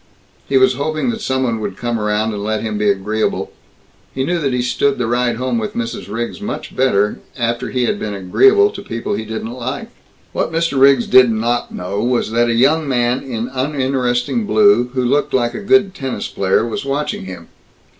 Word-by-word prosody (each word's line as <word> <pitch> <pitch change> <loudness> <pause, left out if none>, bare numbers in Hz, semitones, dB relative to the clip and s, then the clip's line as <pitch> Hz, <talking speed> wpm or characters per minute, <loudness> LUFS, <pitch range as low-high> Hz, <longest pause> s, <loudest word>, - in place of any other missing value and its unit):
He 135 - +3
was 130 0 +5
hoping 155 - -1
that 225 -1 -6
some 130 -7 0
one 115 -3 -1
would 100 -3 -5
come 120 -1 -2
around 105 +1 0
and 100 -1 -4
let 110 +1 -1
him 110 -1 -3
be 105 -1 +2
agreeable. 105 +2 -1 0.6
He 130 - 0
knew 175 +5 0
that 140 -4 0
he 125 -1 0
stood 135 +3 +1
the 125 - -1
ride 120 0 0
home 125 0 -1
with 110 - -4
Mrs. 115 -3 -4
Riggs 120 - -4
much 210 - -5
better 105 -6 +1 0.2
after 120 0 -1
he 125 +2 0
had - - -1
been 105 -1 -4
agreeable 400 - +4
to - - -8
people 115 0 -4
he 110 +2 -3
didn't 110 +1 -5
like. 130 +2 -5 0.4
What - - -1
Mr. 165 -4 0
Riggs 135 -3 +6
did 130 -1 +6
not 115 +2 -1
know 95 +3 -3
was 120 -2 0
that 120 +1 +2
a 115 - +1
young 145 +6 +3
man 120 0 +1
in 120 -3 -4
uninteresting 130 - -1
blue, 205 - +4
who 130 -1 -1
looked 140 +3 +1
like 120 -2 +1
a - - -5
good 200 -1 +3
tennis 135 -6 -4
player, 95 +3 +1
was 115 - -4
watching 140 -6 -2
him. 90 -3 -9
125 Hz, 205 wpm, -18 LUFS, 110-135 Hz, 0.6 s, Riggs